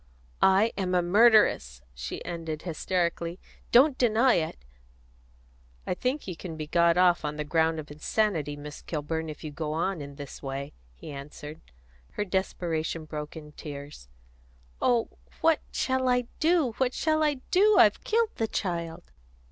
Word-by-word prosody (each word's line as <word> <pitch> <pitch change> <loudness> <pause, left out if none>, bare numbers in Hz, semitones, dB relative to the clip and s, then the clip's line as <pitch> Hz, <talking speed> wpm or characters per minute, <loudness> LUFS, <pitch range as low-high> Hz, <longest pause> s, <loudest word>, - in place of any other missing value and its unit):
"I 195 +4 +4
am 185 -1 0
a 180 - +3
murderess," 180 - +4
she - - -6
ended 165 -3 -5
hysterically. 170 0 -2 0.3
"Don't 270 +3 +6
deny 240 +1 +4
it!" 155 - -2 1.2
"I - - 0
think 255 +9 -2
you 180 - -4
can 165 -1 -7
be 155 - -4
got 170 +2 +3
off 180 -2 +4
on 150 0 -2
the 150 - -3
ground 160 +1 +1
of 150 -1 -8
insanity, 155 -1 0
Miss 145 0 -9
Kilburn, 160 +1 -3
if 150 - -9
you 155 - -5
go 150 0 -3
on 170 +1 -1
in 140 0 -8
this 140 -1 -9
way," 135 0 -5 0.2
he 150 - -10
answered. 150 +2 -9 0.5
Her 210 - -2
desperation 170 -4 -2
broke 150 0 -6
in 150 -1 -10
tears. 140 - -9 0.7
"Oh, 240 -2 +3 0.3
what 325 -1 +4
shall 260 -1 0
I 250 0 +3 0.2
do 320 -5 +3
what 255 -1 +1
shall 315 -1 +1
I 300 -1 +2 0.2
do? 410 +3 +5
I've - - +5
killed 450 0 +1
the 225 - 0
child!" 170 - -4
170 Hz, 155 wpm, -28 LUFS, 150-220 Hz, 1.2 s, Don't